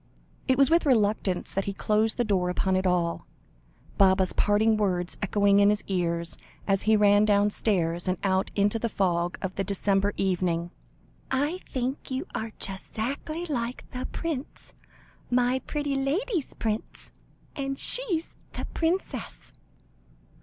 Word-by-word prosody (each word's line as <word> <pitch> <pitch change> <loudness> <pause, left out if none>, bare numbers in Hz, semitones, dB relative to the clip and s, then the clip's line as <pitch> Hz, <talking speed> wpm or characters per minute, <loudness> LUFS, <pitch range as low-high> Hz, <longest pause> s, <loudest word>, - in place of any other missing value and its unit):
It 260 -1 +3
was 275 +2 +4
with 335 -2 +4
reluctance 210 -6 +1
that 195 - -1
he 200 - -2
closed 215 +2 +1
the 240 - +2
door 190 -5 +1
upon 190 +1 +1
it 185 0 +1
all, 175 -2 0 0.7
Baba's 190 -1 +4
parting 215 +2 +3
words 180 -4 0
echoing 200 0 +3
in 200 0 +6
his 210 0 0
ears, 170 -3 -1 0.3
as 195 -1 +2
he 220 0 +4
ran 205 0 +5
downstairs, 200 -4 +1
and 185 0 +1
out 190 -1 +1
into 205 +2 +2
the 230 - -1
fog 175 -3 0
of 190 -1 -2
the 195 - +1
December 200 +1 0
evening 175 -3 0 0.6
"I 290 +7 0
think 260 +3 -3
you 265 +5 -3
are 220 0 -3
just 195 -1 -6
'zackly 295 +9 -3
like 245 -4 -3
the 255 0 -4
prince 310 -5 -5 0.6
my 250 +1 +2
pretty 290 -2 -2
lady's 315 - -1
prince 220 -1 -4 0.4
and 275 -1 -3
she's 380 - 0 0.2
the - - -4
princess!" 340 +3 -2
210 Hz, 145 wpm, -27 LUFS, 190-260 Hz, 0.7 s, in